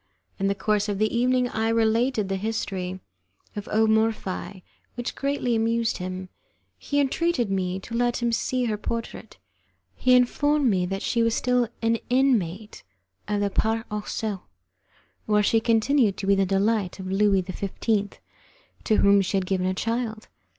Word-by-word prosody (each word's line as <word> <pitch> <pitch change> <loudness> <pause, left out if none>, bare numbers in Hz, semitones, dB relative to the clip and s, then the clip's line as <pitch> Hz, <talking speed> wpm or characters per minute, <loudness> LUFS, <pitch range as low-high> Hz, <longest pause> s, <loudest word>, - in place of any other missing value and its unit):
In 195 - +1
the 200 - +1
course 210 +1 0
of 200 - -1
the 215 +2 0
evening 250 +1 +2
I 225 -1 -1
related 225 0 +1
the 195 - -1
history 190 -3 -3 0.6
of 205 -1 -6
O 220 +1 +3
Morphi, 220 -4 -1 0.3
which 240 0 -4
greatly 275 -4 -1
amused 230 0 0
him. 185 0 -5 0.5
He 285 - -1
entreated 280 -4 0
me 185 -1 -1
to 230 - -10
let 240 0 +1
him 240 -1 0
see 250 +2 0
her 215 -3 -2
portrait. 230 +2 -5 0.6
He 255 0 +3
informed 290 +3 +2
me 185 -5 +1
that 195 +1 -4
she 235 - +1
was 230 0 +2
still 250 -1 +1 0.2
an 230 0 +2
inmate 220 -6 +1 0.5
of 205 0 -1
the 200 -1 0
'Parc 225 +3 0
aux 210 -1 -3
cerfs', 210 -4 -3 0.9
where 210 -1 +3
she 225 +2 +3
continued 225 -1 +2
to 195 - -4
be 200 - +4
the 195 -1 +2
delight 200 0 0
of 190 -1 -6
Louis 195 -1 +3
XV., 195 +2 -5 1.2
to 220 - +3
whom 200 -1 +5
she 195 +1 -1
had 190 - -1
given 185 -1 0
a 185 - -1
child. 225 0 -3
220 Hz, 165 wpm, -25 LUFS, 195-235 Hz, 1.2 s, whom